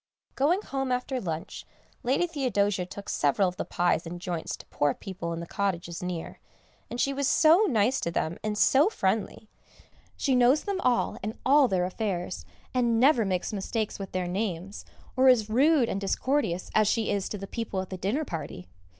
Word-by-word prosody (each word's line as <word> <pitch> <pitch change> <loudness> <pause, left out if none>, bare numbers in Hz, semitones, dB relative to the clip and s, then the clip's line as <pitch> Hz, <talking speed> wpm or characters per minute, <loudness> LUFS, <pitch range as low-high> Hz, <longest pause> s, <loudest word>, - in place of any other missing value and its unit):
Going 340 +9 +1
home 270 -1 -3
after 250 +1 -1
lunch 165 -3 -5 0.4
Lady 265 +7 +1
Theodosia 205 - 0
took 200 +2 -9
several 150 +7 +2
of 180 0 -5
the - - -2
pies 175 -1 0
and 175 +1 -6
joints 175 -2 -4
to - - -13
poor 145 -1 0
people 185 -3 -6
in 165 - -3
the - - -5
cottages 175 -3 -3
near, 180 -2 -5 0.5
and 240 - -5
she 275 +2 +1
was 275 0 0
so 330 +9 +5
nice 240 +1 +2
to - - -1
them, 165 0 -2
and 215 -1 -2
so 280 - +5
friendly; 215 - -2 0.7
she 275 - +1
knows 250 +4 +4
them 395 -2 -2
all 250 -1 +1
and 215 +2 -5
all 280 0 +6
their 185 -4 +1
affairs, 185 -2 -3 0.3
and 240 -3 +2
never 255 -3 +4
makes 185 +1 -2
mistakes 210 +2 -3
with 195 -2 -6
their 185 -1 -2
names, 190 0 -4 0.3
or 260 0 +5
is 220 -4 +3
rude 275 +1 +4
and 195 - -3
discourteous 200 -2 -1
as 215 -1 +4
she 220 0 +1
was 200 -1 -2
to 210 - -4
the 195 - -6
people 210 -2 -4
at 190 0 -5
the - - -3
dinner 220 - -1
party. 160 - -6
210 Hz, 190 wpm, -27 LUFS, 180-260 Hz, 0.7 s, all